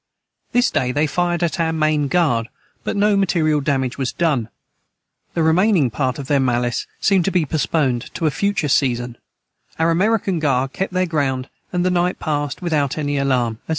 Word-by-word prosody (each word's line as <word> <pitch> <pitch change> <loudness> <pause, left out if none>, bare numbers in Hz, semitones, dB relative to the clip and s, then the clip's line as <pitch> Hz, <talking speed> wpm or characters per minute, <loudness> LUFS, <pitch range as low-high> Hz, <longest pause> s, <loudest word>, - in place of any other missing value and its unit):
This 245 0 +2
day 125 -1 0
they 145 +4 +1
fired 175 +2 0
at 170 +2 -1
our 165 -1 +1
main 155 -2 +1
guard 135 -9 +1 0.3
but - - -2
no 205 0 +3
material 165 -6 +2
Damage 135 -2 -1
was 130 -2 -1
done 140 -10 0 0.9
the 165 - +1
remaining 165 - +3
part 130 0 -1
of 140 - -6
their 140 +1 +2
mallice 120 -2 0
seemed 195 -3 +3
to 195 - +1
be 180 -4 +1
postponed 140 -4 -1
to 165 - -2
a 155 - +3
future 200 -1 0
season 120 -3 0 0.6
our 165 +1 +2
american 195 0 +1
guard 135 -3 0
kept 190 -1 -3
their 185 0 +1
ground 135 -6 -1 0.2
and 180 -1 0
the 185 - +2
night 180 0 +1
passed 145 +2 -3
without 150 -5 0
any 145 -2 -1
alarm 125 -5 0
&c. - - -25
155 Hz, 185 wpm, -20 LUFS, 130-175 Hz, 0.9 s, no